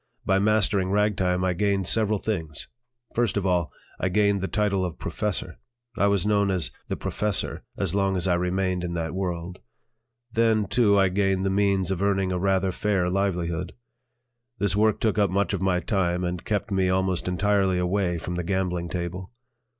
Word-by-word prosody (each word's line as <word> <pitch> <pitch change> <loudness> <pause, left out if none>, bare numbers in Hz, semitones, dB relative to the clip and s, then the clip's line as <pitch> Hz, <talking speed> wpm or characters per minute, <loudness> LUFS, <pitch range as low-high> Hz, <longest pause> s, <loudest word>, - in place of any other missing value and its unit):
By 95 0 +3
mastering 100 -2 +2
ragtime 95 -3 +1
I 90 -1 +1
gained 100 +1 0
several 110 +2 +2
things: 80 -9 -3 0.5
first 115 -4 +1
of 100 - -1
all, 90 -3 +1 0.3
I 95 - 0
gained 100 +1 +2
the 95 - -1
title 105 -3 0
of 90 -3 -4
professor. - - -2 0.4
I 100 -2 +2
was 100 -2 +1
known 100 -1 +2
as 90 -4 0 0.2
"the - - -2
professor" 105 -2 -1 0.2
as - - -1
long 95 -1 +1
as 90 0 +1
I 90 - +3
remained 90 +1 0
in 85 -1 -3
that 80 -1 -3
world. 90 -1 -4 0.7
Then, 110 -2 +2
too, 105 -1 +3
I 95 -1 +4
gained 95 0 +1
the 95 - +1
means 95 -2 +1
of 95 -1 -2
earning 95 -2 +1
a 90 - -1
rather 95 0 +1
fair 95 -2 0
livelihood. 90 -3 -1 0.8
This 100 -3 +1
work 110 0 +2
took 110 -1 +1
up 100 -2 +3
much 100 +2 0
of - - -2
my 95 -2 +2
time 90 -2 0
and 90 -1 -3
kept 105 -1 -2
me 95 -1 +2
almost 95 -1 0
entirely 95 0 +2
away 90 0 0
from 85 +2 -5
the 90 0 -2
gambling 90 -1 -1
table. 90 +2 -5
95 Hz, 180 wpm, -25 LUFS, 90-100 Hz, 0.8 s, I